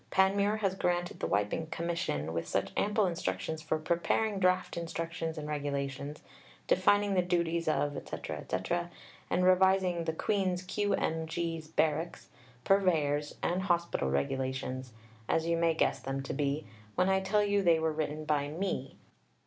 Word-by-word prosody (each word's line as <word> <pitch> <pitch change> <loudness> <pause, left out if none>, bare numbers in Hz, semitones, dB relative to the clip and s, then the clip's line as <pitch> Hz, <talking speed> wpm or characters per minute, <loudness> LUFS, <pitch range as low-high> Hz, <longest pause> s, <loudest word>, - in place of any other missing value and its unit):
Panmure 200 +3 +3
has 195 -2 +2
granted 175 -1 -1
the - - -1
wiping 105 +10 0
"Commission" 160 - -2
with 85 - -2
such - - -1
ample 210 0 +2
instructions 165 -2 -2
for 155 0 0
"preparing 175 +6 0
draft 185 0 +2
Instructions 165 -1 -3
and 150 -1 -4
Regulations," 140 -1 -3 0.4
defining 205 - +3
the 185 - +4
duties 170 -2 0
of 145 -2 +1
etc., - - -5
etc., 175 0 -2 0.4
and 180 - +2
revising 185 -2 +4
the 160 - 0
"Queen's 185 0 0
Q.M.G's., 165 -4 -1
Barracks', 160 +1 -1 0.3
Purveyor's 155 -7 +2
and 180 +2 +1
Hospital 170 - 0
Regulations," 130 - -2 0.4
as 160 - +2
you 170 0 +2
may 165 -1 +2
guess - - +2
them 135 0 -3
to - - -4
be, 145 +2 -1 0.3
when 180 - +3
I 190 0 +3
tell 200 +2 +2
you 205 0 +2
they 170 -3 +5
were 160 -1 0
written 155 0 -3
by 145 -2 +1
me.... 155 -4 -3
165 Hz, 150 wpm, -31 LUFS, 150-185 Hz, 0.4 s, they